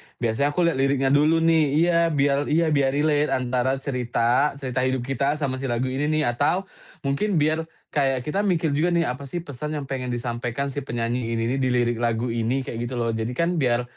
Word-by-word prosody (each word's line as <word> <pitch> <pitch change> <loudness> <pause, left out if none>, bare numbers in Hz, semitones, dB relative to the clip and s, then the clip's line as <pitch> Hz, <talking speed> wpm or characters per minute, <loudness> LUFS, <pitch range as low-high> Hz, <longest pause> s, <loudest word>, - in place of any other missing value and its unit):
biasanya 120 +4 0
aku 180 - +2
lihat 170 -5 +2
liriknya 135 0 +2
dulu 155 +3 +4
nih, 165 -1 +4
iya 170 +1 +3
biar 145 -2 +1
iya 160 +1 +2
biar 140 -1 +2
relate 150 0 +2
antara 130 +1 0
cerita, 125 +1 +1
cerita 130 -2 -3
hidup 130 -1 0
kita 140 +3 0
sama 135 -3 -2
si 135 - -3
lagu 125 +2 -1
ini 145 +3 -1
nih, 155 0 +1
atau 145 +10 +1 0.4
mungkin 170 +9 0
biar 160 +1 +1 0.2
kayak 135 -4 +1
kita 175 +6 -2
mikir 165 -4 +1
juga 170 +4 +1
nih, 170 - +3
"Apa 140 +2 -7
sih 170 +4 -5
pesan 150 +2 -5
yang 145 - -3
pengen 130 -2 -4
disampaikan 120 +2 -3
si 145 - -3
penyanyi 115 0 -2
ini 115 - -1
nih - - -2
di 130 - +1
lirik 120 -2 +1
lagu 115 0 0
ini?" 120 +4 -1
kayak 115 - -6
gitu 130 - -5
loh. 115 -1 0
Jadi 115 +2 -3
kan 170 +1 0
biar 125 -2 +2
135 Hz, 210 wpm, -24 LUFS, 125-150 Hz, 0.4 s, dulu